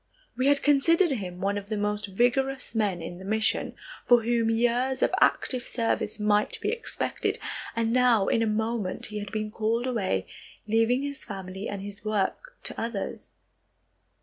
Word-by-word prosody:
We 255 +2 +1
had 285 0 +3
considered 330 +4 +4
him 185 -8 -4
one 200 +1 0
of 200 0 -13
the 215 - -1
most 210 0 -1
vigorous 250 +7 +1
men 200 -6 0
in 175 +2 -7
the - - -9
mission, 220 +2 0 0.3
for 240 -2 +6
whom 230 -1 +2
years 245 +3 +1
of - - +2
active 255 -2 +3
service 225 -2 -1
might 210 0 +2
be - - -1
expected, 475 - -2 0.4
and 230 0 +1
now 245 -5 +4
in 230 - +2
a 225 - +2
moment 220 -2 -1
he 210 0 -5
had 205 -1 -6
been 215 -1 -3
called 225 +2 0
away, 195 - 0 0.4
leaving 225 +4 +2
his 285 -1 -4
family 190 -1 -6
and 200 -1 -5
his 200 0 -8
work 215 - -2
to - - -3
others. 225 -4 -4
225 Hz, 170 wpm, -27 LUFS, 205-245 Hz, 0.4 s, for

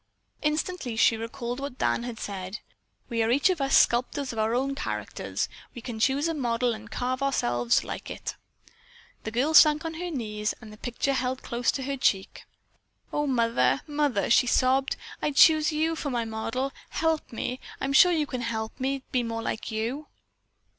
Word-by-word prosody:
Instantly 300 -4 -1
she 225 +1 +4
recalled 235 +2 -5
what 275 -2 -5
Dan - - +1
had 240 -1 -6
said: 190 0 -5 0.5
"We 230 -2 -1
are 225 - +2
each 280 +9 +4
of 345 -6 -2
us 275 0 +4
sculptors 255 +2 +2
of 225 - -4
our 220 +2 +1
own 270 +2 0
characters. 275 - -3 0.3
We 240 - -7
can 235 -3 -5
choose 275 +6 +2
a 330 - 0
model 240 -4 0
and 220 0 -9
carve 255 +3 -2
ourselves 120 - +1
like - - -6
it." - - -5 0.9
The - - -1
girl 255 +8 0
sank 305 0 +7
on 325 - -3
her 350 +2 -4
knees, 215 -7 -3
the 215 -2 -11
picture 245 +5 -2
held 260 0 -2
close 240 0 0
to 270 - -3
her 275 +1 -3
cheek. 195 -7 0 0.7
"Oh, 295 0 0
mother, 235 0 +2
mother!" 290 -9 0
she 250 - +5
sobbed, 265 +2 +2 0.3
"I - - +1
choose 310 +2 +6
you 320 +2 0
for 300 - -3
my 240 -3 -1
model. 230 +5 -3 0.2
Help 320 -1 -1
me; 250 +2 -3 0.2
I - - -2
am 275 - -1
sure 355 +6 +7
you 315 -3 +1
can 255 -3 -4
help 225 0 -4
me 270 +1 -1
to - - -42
be 250 - +2
more 230 -1 -3
like 220 - -3
you." 235 +7 -3
255 Hz, 190 wpm, -27 LUFS, 230-285 Hz, 0.9 s, sank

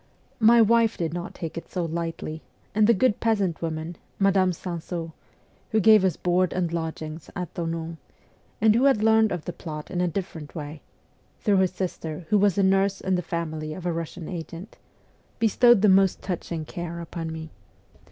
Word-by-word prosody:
My 230 +1 +7
wife 230 0 +3
did 165 -2 -2
not 175 0 -5
take 165 0 -5
it - - -17
so 180 -2 -2
lightly, 165 -1 -4 0.3
and 215 0 +4
the 235 - +6
good 215 +2 +2
peasant 205 -7 0
woman, 160 0 -4 0.2
Madame 195 -2 +3
Sansaux, 170 -1 -5 0.6
who 220 - +2
gave 215 -1 +6
us 185 -4 +1
board 180 0 +1
and 175 -2 -1
lodgings 160 -1 -5
at 180 -3 -5
Thonon, 165 -1 -4 0.6
and 220 0 +5
who 240 +5 +3
had 265 -6 +4
learned 220 -1 +4
of 175 -3 -4
the 175 - -4
plot 155 -2 -7
in 180 -1 -1
a 180 - +2
different 170 -4 -5
way 150 -1 -6 0.6
(through 205 -3 +3
her 190 0 +4
sister, 175 -3 -5
who 210 - +4
was 200 -2 +3
a 200 - +3
nurse 195 +1 +2
in 190 - -1
the 180 - +1
family 155 -3 -4
of 180 - -8
a 175 - 0
Russian 165 0 -5
agent), 170 +2 -7 0.6
bestowed 230 0 +5
the - - +7
most 195 -1 +4
touching 170 -3 -4
care 170 +1 -6
upon 165 -1 -5
me. 160 -1 -7
175 Hz, 180 wpm, -25 LUFS, 165-200 Hz, 0.6 s, My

